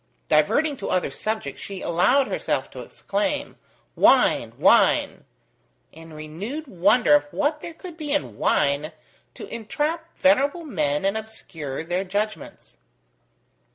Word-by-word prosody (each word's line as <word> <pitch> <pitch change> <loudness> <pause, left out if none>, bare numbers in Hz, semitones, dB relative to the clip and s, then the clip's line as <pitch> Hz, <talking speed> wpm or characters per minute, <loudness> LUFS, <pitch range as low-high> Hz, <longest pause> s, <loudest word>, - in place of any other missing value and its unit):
Diverting 285 - +2
to 200 - -5
other 185 - 0
subjects, 215 -11 -4
she 195 -2 -7
allowed 195 +12 +3
herself - - -2
to - - -9
exclaim, - - -3 0.4
"Wine, - - +4
wine!" - - +3 0.7
in 165 0 -13
renewed 170 - -6
wonder 210 - +3
of 295 - +5
what 295 +1 -1
there 335 - -8
could 345 -2 -10
be 300 -3 -5
in 295 0 -2
wine 140 +2 +1 0.4
to - - -8
entrap 300 +9 -3
venerable 285 +4 +2
men 150 - -1
and 195 +2 +1
obscure 165 -10 -6
their 175 +3 -2
judgements. 205 - -5
215 Hz, 125 wpm, -24 LUFS, -, 0.7 s, of